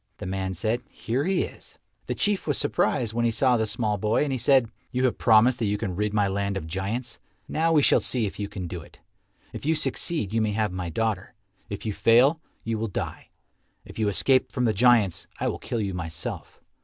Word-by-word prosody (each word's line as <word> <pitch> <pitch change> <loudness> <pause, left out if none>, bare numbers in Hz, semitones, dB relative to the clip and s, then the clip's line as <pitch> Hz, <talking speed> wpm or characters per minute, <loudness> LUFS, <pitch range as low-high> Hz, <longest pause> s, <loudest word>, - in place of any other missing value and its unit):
The - - -7
man 95 0 -3
said, 110 +6 -1
"Here 125 +6 -2
he 190 -1 +1
is." - - -11 0.3
The - - -2
Chief 205 -4 +1
was 145 - +1
surprised 130 -5 0
when 120 +1 0
he 120 - +3
saw 125 +2 +3
the 110 -2 0
small 105 -2 -1
boy, 110 +7 +2
and 145 - -2
he 130 - 0
said, 130 -2 +3 0.2
"You 130 0 +1
have 125 - 0
promised 115 +3 +5
that 115 - 0
you 105 0 0
can 100 -4 -3
rid 105 +2 -1
my 105 -1 +2
land 100 0 -1
of 95 - -5
giants. 100 +8 -4 0.3
Now 165 +1 +1
we 150 -3 +4
shall - - +5
see 120 -4 +1
if 100 - -6
you 100 -1 -3
can 100 -4 -6
do 85 0 -6
it. 85 - -17 0.5
If - - -7
you 160 +3 +2
succeed 150 - -1
you 115 - +2
may 110 -1 0
have 105 -2 0
my 90 -1 -4
daughter. 105 +3 -2 0.3
If 100 +1 -6
you 105 - -1
fail, 130 +10 +4 0.2
you 115 -1 -2
will 115 - -1
die. 100 - -5 0.6
If - - -10
you 110 - +1
escape 130 +6 +3
from 125 - 0
the 110 - +2
giants, 110 -4 +3
I - - 0
will - - -2
kill 120 - -3
you 100 -3 -2
myself. 80 -2 -5
110 Hz, 230 wpm, -26 LUFS, 100-125 Hz, 0.6 s, promised